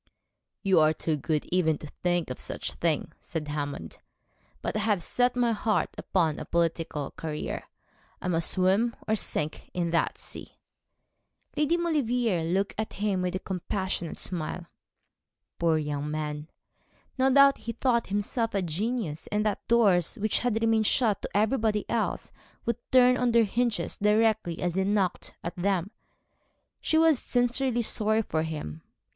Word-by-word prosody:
'You 190 -4 +4
are 155 0 +5
too 160 0 -1
good 150 +1 -1
even 165 -4 +2
to - - -10
think 175 0 -1
of 125 - -6
such - - -4
a - - -17
thing,' 165 -3 0
said 155 -2 -5
Hammond; 145 - -4 0.6
'but - - -2
I - - +1
have 205 -4 +1
set 245 0 +1
my 240 -1 +2
heart 215 0 0
upon 165 -5 0
a - - -5
political 165 -3 -1
career. 155 -2 -5 0.5
I - - -5
must 165 -2 +1
swim 195 +6 +2
or 220 - +2
sink 155 -6 -1
in 170 -2 0
that 165 - +1
sea.' - - -9 1.0
Lady 300 +3 +2
Maulevrier 245 - +1
looked 190 +5 0
at 220 - -3
him 200 -2 0
with 180 0 -1
a 185 - -5
compassionate 190 -2 -3
smile 175 0 -4 0.9
Poor 165 -2 +3
young 150 -1 -2
man! 150 0 -4 0.7
No 265 +1 +4
doubt 275 +1 +6
he 230 - -5
thought 235 -1 +1
himself 205 +3 -1
a 195 - +1
genius, 180 -1 -2
and 210 +1 +1
that 210 -2 -2
doors 200 -7 +3
which 215 -2 0
had 240 -3 0
remained 225 -1 +3
shut 220 -5 +2
to - - -3
everybody 215 -1 +1
else 230 -2 -1 0.3
would 235 - 0
turn 250 -1 +6
on 245 -2 +1
their 235 -1 +6
hinges 235 +2 -1
directly 210 -4 +2
he 180 +3 -1
knocked 195 -2 0
at 170 - -4
them. 190 +1 0 0.9
She 315 - +1
was 320 -4 +5
sincerely 245 0 +1
sorry 220 0 +2
for 160 -5 -1
him. 150 - -5
200 Hz, 155 wpm, -28 LUFS, 165-230 Hz, 1.0 s, doubt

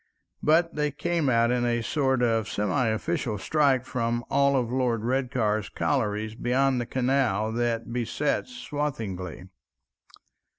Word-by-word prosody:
But 165 +2 +3
they 150 0 0
came 170 -1 -1
out 115 -1 +3
in 125 -1 +1
a 120 -1 0
sort 130 -2 +1
of 115 -2 +1
semiofficial 110 - -1
strike 140 -1 +2
from 120 -1 -2
all 140 -1 +3
Lord 120 -2 -1
Redcar's 120 -6 0
collieries 105 +5 -1
beyond 130 +2 +1
the 120 - -5
canal 125 -5 +1
that 115 0 -1
besets 125 - -1
Swathinglea. 115 - -4
120 Hz, 120 wpm, -26 LUFS, 110-135 Hz, -, But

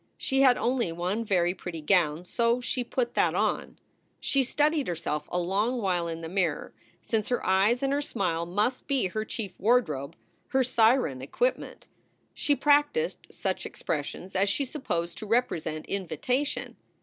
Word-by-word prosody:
She 270 0 +1
had 255 -2 +6
only 240 -7 0
one 180 +7 -2
very 180 -5 +2
pretty 180 -3 -7
gown, 160 -1 +2
so 235 +6 +1
she 250 +1 -2
put 240 0 -2
that - - +2
on. - - -1 0.4
She 275 - +2
studied 295 +3 +1
herself 155 -3 -3
a - - 0
long 200 +8 0
while 180 -5 0
in 165 0 -5
the 165 - -5
mirror, 175 -3 -1 0.3
since 220 -3 -1
her 245 - -1
eyes 200 +7 +3
and 275 0 +1
her 285 - +1
smile 170 - -1
must 210 +8 0
be 275 -7 +1
her 215 +4 -2
chief 210 -3 -6
wardrobe, 170 - +1 0.3
her 265 0 +2
siren 230 - +3
equipment. - - -2 0.5
She 290 - +1
practiced 295 - +2
such - - -2
expressions 185 - -4
as 195 +2 +3
she 280 - +1
supposed 175 - -3
to 215 - -7
represent 200 -9 0
invitation. 200 - -2
210 Hz, 160 wpm, -28 LUFS, 175-255 Hz, 0.5 s, had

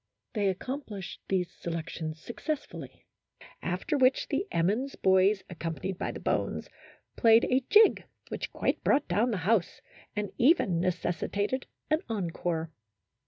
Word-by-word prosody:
They 205 -3 +2
accom 260 +10 -5
plished 195 -8 -7
these 180 -2 0
selections 160 -1 -5
successfully, 295 - -6 0.6
after 185 - -1
which 260 0 +3
the 310 +8 -1
Emmons 215 +11 0
boys, 190 +1 +3
accompanied 170 +1 -4
by - - -1
the - - -7
bones, - - -1 0.5
played 225 -1 +6
a 255 +1 +2
jig 430 +1 +6 0.2
which - - -4
quite - - -1
brought 285 +1 +3
down 210 +8 +2
the 215 - 0
house, 215 -4 +2 0.4
and 210 -2 -2
even 240 - +4
necessitated 185 +7 -1 0.2
an 310 +1 +3
encore. 170 -5 -2
200 Hz, 130 wpm, -29 LUFS, 175-255 Hz, 0.6 s, played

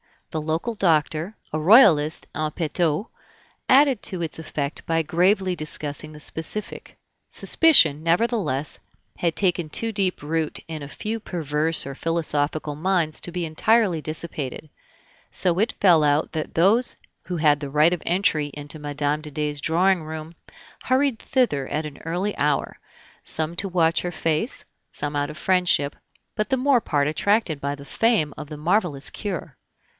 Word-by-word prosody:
The 155 - -2
local 160 +9 -2
doctor, 165 +1 +1 0.2
a 155 - -1
Royalist 160 - +5
in 155 0 -1
petto, 160 +3 -1 0.6
added 270 -3 +5
to 185 -2 -3
its 160 -1 -3
effect 150 -2 -4
by 165 0 +1
gravely 185 +3 +2
discussing 155 -1 -4
the 150 - -12
specific. 165 +8 -5 0.3
Suspicion, 165 - +5
nevertheless, 165 - 0 0.4
had 170 -2 0
taken 175 -4 +1
too 225 +8 -2
deep 195 -6 -1
root 160 +1 -1
in 160 -2 -6
a 140 - -6
few 215 +9 -4
perverse 160 -4 0
or 140 - -5
philosophical 155 -1 -1
minds 170 -1 0
to 175 - -2
be 175 -1 -3
entirely 185 +2 +2
dissipated; 155 -2 -5 0.6
so 180 -1 +1
it 225 +4 +1
fell 175 -5 +4
out 145 +1 +2
that 155 -1 -5
those 205 +9 +3 0.3
who 180 - -3
had 150 -2 +3
the 145 -2 -5
right 150 +4 +4
of 175 - -3
entry 165 -4 +1
into 145 +1 -8
Mme. 145 0 -1
de 150 - -8
Dey's 150 0 -2
drawing 175 +3 +2
room 155 +1 -7 0.5
hurried 260 -2 +2
thither 200 - 0
at 155 +1 -2
an 150 -2 -8
early 180 +5 -2
hour, 145 -1 0 0.4
some 160 +1 -2
to 200 - 0
watch 165 -3 +2
her 175 0 -4
face, 165 - -1 0.3
some 145 0 -4
out 145 0 -1
of 150 - -9
friendship, 175 -4 +2 0.4
but 215 0 -1
the 265 - +2
more 260 -1 +3
part 145 -6 0
attracted 170 0 +1
by 140 +1 -2
the 140 0 -12
fame 195 - +1
of 150 - -7
the 150 0 -8
marvelous 160 -3 0
cure. 195 -7 -5
160 Hz, 160 wpm, -23 LUFS, 150-190 Hz, 0.6 s, Royalist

